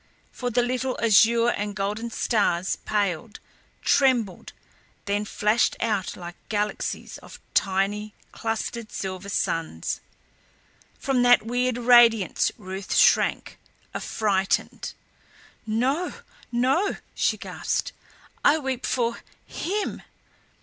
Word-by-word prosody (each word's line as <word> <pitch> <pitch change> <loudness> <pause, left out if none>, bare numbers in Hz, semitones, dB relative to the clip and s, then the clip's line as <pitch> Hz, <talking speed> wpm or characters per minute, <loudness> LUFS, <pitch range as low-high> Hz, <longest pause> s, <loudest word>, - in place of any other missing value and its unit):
For 245 - -3
the 245 +1 +2
little 255 +1 -1
azure 230 +1 +5
and 205 -2 -2
golden 205 +4 -2
stars 205 -6 +1
paled, 205 0 -1 0.4
trembled, 245 -9 +2 0.5
then 205 +1 0
flashed 210 +3 +2
out 210 -5 -1
like 175 -1 -7 0.2
galaxies 210 -1 -2
of - - -13
tiny, 200 +2 0 0.2
clustered 225 0 -4
silver 190 0 -5
suns. 165 - -2 1.0
From 265 -2 +1
that 245 -2 +5
weird 245 +1 0
radiance 235 -5 +5
Ruth 190 -2 -5
shrank, - - +3 0.3
affrighted. 195 -3 -1 0.7
"No 260 +11 0 0.4
no," 265 +11 +2 0.2
she - - +1
gasped. - - -3 0.5
"I 295 - +5
weep 265 -4 -3
for 235 -2 0 0.3
HIM." 410 +4 -3
225 Hz, 100 wpm, -25 LUFS, 200-245 Hz, 1.0 s, azure